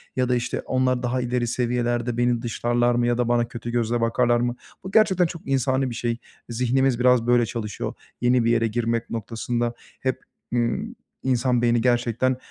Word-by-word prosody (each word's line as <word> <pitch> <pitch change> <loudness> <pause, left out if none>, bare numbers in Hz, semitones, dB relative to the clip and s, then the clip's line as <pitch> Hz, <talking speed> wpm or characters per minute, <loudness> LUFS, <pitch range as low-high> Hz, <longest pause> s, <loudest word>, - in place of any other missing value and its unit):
ya 130 -1 +1
da 125 - +3
işte, 120 - -2
"Onlar 130 -1 +1
daha 125 +1 0
ileri 125 0 -1
seviyelerde, 120 0 -1
beni 120 -1 +1
dışlarlar 120 0 +1
mı 120 0 +2
ya 120 0 +1
da 125 -1 +1
bana 120 0 +2
kötü 120 0 -6
gözle 120 0 0
bakarlar 120 +1 +2
mı?" 120 0 -1 0.3
Bu 190 - -6
gerçekten 195 -5 +4
çok 165 -1 -6
insani 130 0 +1
bir 120 - -6
şey. 120 0 -1 0.3
Zihnimiz 125 +2 +1
biraz 125 -1 +4
böyle 120 -1 +4
çalışıyor. 110 -2 -4 0.3
Yeni 125 0 +3
bir 115 - +3
yere 115 -1 +2
girmek 115 +1 -1
noktasında 115 +2 -2 0.3
hep, 130 -1 -2 0.3
ımm, 125 - -1 0.3
insan 125 -1 +1
beyni 120 -1 +3
gerçekten, 120 +1 +1
120 Hz, 180 wpm, -24 LUFS, 120-125 Hz, 0.3 s, gerçekten